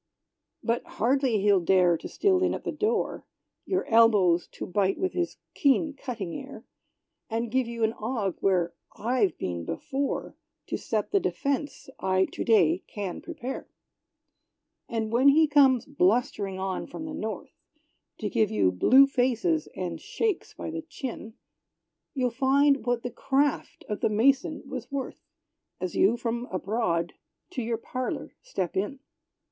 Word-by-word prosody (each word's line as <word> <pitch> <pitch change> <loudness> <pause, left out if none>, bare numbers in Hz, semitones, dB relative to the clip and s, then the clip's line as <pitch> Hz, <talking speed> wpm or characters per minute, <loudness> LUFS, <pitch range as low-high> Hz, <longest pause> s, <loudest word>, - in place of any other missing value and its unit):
But 235 +1 0
hardly 250 -2 +2
he'll 200 -1 +4
dare 180 -1 +4
to - - -6
steal 385 -2 +2
in 370 - +2
at - - -7
the - - -2
door, 435 +1 -1 0.4
Your 375 - 0
elbows 205 -7 +4
to - - -5
bite 195 +1 +1
with 375 -1 -1
his 350 -1 -2 0.2
keen 290 +1 +2
cutting 230 -10 -5
air, 270 -5 -9 0.6
And 230 0 -2
give 260 -1 +1
you 235 -1 -3
an 220 0 +2
ague, 220 -6 -1
where 180 -3 +2 0.2
I've 225 -5 +1
been 85 -2 -3
before, 275 - -3 0.3
To - - -1
set 215 -2 -2
the 400 - +4
defence 285 -5 -2
I 190 0 +2
to - - -3
day 180 -6 +4
can 200 -4 -5
prepare. 280 -6 -6 1.2
And 225 -2 -2
when 250 +4 +4
he 310 +3 +7
comes 275 -5 +5
blustering 205 -5 +1
on 190 0 -3
from 315 +3 -7
the 310 - -6
north, 220 -8 -5 0.7
To - - -1
give 220 -4 +2
you 100 -3 +2
blue 255 - +6
faces, 275 +5 +1
and - - -4
shakes 430 -6 -2
by - - -5
the 325 0 -4
chin, 255 -7 -7 0.8
You'll 250 -2 +1
find 275 +2 +3
what 245 -1 +1
the 245 - -3
craft 275 +4 0
of 210 - -3
the - - +1
mason 270 +8 +2
was 255 -2 -6
worth, 275 -2 -4 0.6
As 185 -2 -4
you 220 +5 +4
from 240 +1 -3
abroad 185 -3 -1 0.4
to 265 - -3
your 230 0 -1
parlor 255 +2 -4
step 190 - -3
in! 205 +8 -1
235 Hz, 150 wpm, -27 LUFS, 200-275 Hz, 1.2 s, he